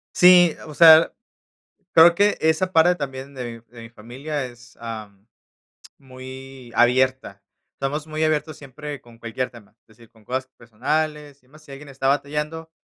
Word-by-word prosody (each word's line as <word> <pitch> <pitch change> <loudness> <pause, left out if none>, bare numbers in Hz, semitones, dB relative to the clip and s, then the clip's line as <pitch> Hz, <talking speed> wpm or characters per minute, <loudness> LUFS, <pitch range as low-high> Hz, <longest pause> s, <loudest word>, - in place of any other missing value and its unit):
Sí, 180 -2 +6
o 155 - -10
sea, 160 +1 +7 0.8
creo 170 +1 +7
que 205 +3 +2
esa 160 +4 0
parte 170 +2 +4
también 140 -3 -7
de 130 -2 -6 0.2
mi 120 - -29
de 115 - -10
mi 115 - -12
familia 130 +6 -6
es, 120 0 -16
am, 110 -3 -9 0.7
muy 130 -1 -12
abierta. 125 -4 +1 0.3
Estamos 145 +3 -4
muy 155 0 -2
abiertos 155 0 -1
siempre 145 +1 -9
con 120 -1 -19
cualquier 120 +2 -4
tema, 110 -3 -17
es - - -95
decir, 115 +1 -21
con 110 -2 -24
cosas 130 +3 -4
personales 145 +5 -3
y - - -31
demás, 155 +4 -19
si 145 - -18
alguien 140 +2 -11
está 135 -1 -3
batallando, 150 +3 -2
135 Hz, 165 wpm, -22 LUFS, 120-155 Hz, 0.8 s, sea